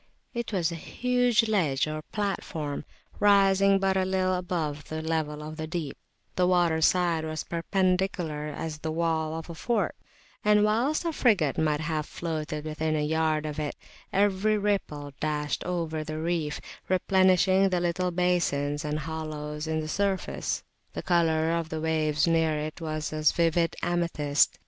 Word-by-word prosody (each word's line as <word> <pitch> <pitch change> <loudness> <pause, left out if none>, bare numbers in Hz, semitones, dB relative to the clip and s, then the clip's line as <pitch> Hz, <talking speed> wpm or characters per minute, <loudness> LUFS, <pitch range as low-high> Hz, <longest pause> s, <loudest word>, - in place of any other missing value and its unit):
It 235 -2 -3
was 180 -4 +1
a 165 -2 -6
huge 245 -2 +2
ledge 160 -11 +2
or 155 0 -4
platform 165 -8 -3 0.3
rising 195 -1 +5
but 195 0 +1
little 185 0 +1
above 165 -5 -2
the 155 - -3
level 155 -2 -2
of 155 +1 -7
the 155 -1 -4
deep; 160 -4 -4 0.4
the 180 -1 +3
water 175 -3 +3
side 170 -1 +3
was 155 0 -3
perpendicular 180 -3 0
as 150 +1 -5
the 160 +1 -3
wall 160 -1 0
of 165 0 -6
a 170 - -7
fort; 225 +6 -1 0.5
and, 210 0 +5
whilst 240 +10 +1
a 335 - 0
frigate 195 - +2
might 155 -1 +1
have 155 -1 -2
floated 155 -2 -4
within 155 0 -1
a 150 - 0
yard 155 0 +1
of 150 0 -4
it, 150 -1 -3 0.4
every 205 +2 +2
ripple 175 -9 -2
dashed 150 -1 -1
over 165 -3 -2
the 155 0 -5
reef, 160 -2 -1 0.3
replenishing 185 +1 +4
the 180 -1 +1
little 175 +1 0
basins 170 -5 0
and 150 0 -2
hollows 155 -1 -5
in 160 0 0
the 155 - -5
surface. 195 +3 -1 0.3
The - - -5
colour 165 -2 +2
of 165 -1 -1
the 160 - -3
waves 155 -2 +1
near 160 -2 +2
it 155 +3 -5
was 155 -1 -3
a 155 - -3
vivid 165 +1 +2
amethyst. 165 -5 +1
165 Hz, 160 wpm, -27 LUFS, 155-185 Hz, 0.5 s, rising